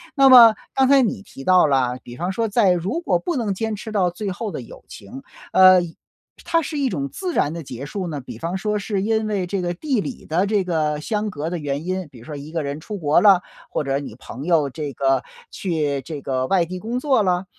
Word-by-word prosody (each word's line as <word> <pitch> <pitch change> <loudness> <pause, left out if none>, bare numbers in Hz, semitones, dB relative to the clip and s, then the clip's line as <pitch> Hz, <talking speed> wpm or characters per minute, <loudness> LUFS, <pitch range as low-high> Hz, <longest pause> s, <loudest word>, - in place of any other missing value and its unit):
那 270 -1 +6
么 235 -4 +9 0.2
刚 265 -1 +3
才 275 -1 +6
你 225 -3 -1
提 135 -8 -12
到 185 -2 +5
了， 125 -3 +1
比 120 - -10
方 175 +5 -2
说 225 +3 -1
在 205 -3 +3
如 190 - -2
果 - - +1
不 350 -3 -3
能 220 -6 -1
坚 220 +2 -3
持 220 +2 -8
到 190 -4 +2
最 195 +3 -4
后 210 +2 -4
的 - - -5
友 120 - -13
情， 110 +6 -11 0.3
呃 185 -1 +7 0.6
它 330 - +1
是 300 0 -5
一 275 -2 +1
种 140 - -3
自 365 -2 -4
然 150 - +1
的 165 -2 -6
结 130 +1 -7
束 185 +3 -4
呢， 150 - -4
比 130 - -9
方 170 +3 -3
说 210 +1 -1
是 200 -1 -2
因 220 +1 0
为 200 -4 -1
这 190 +1 -2
个 175 0 -2
地 250 - -1
理 255 - -7
的 175 +5 +1
这 200 -2 0
个 155 -3 0
相 210 +5 -2
隔 155 -2 -4
的 175 - -3
原 145 +1 -4
因， 185 -3 -3
比 125 - -14
如 115 - -14
说 150 - -7
一 145 +2 -9
个 165 - -2
人 145 +1 -5
出 210 +4 -6
国 155 -1 +3
了， 195 -4 +6 0.3
或 150 - -2
者 135 0 0
你 135 -6 -8
朋 135 - -9
友 160 -4 +2
这 150 +1 -5
个 135 0 +1 0.3
去 150 -7 -2
这 150 -2 -7
个 130 -1 -1
外 180 0 +2
地 185 +2 -6
工 230 +6 -3
作 265 -6 +2
了？ 180 0 0
180 Hz, 265 characters per minute, -21 LUFS, 150-215 Hz, 0.6 s, 么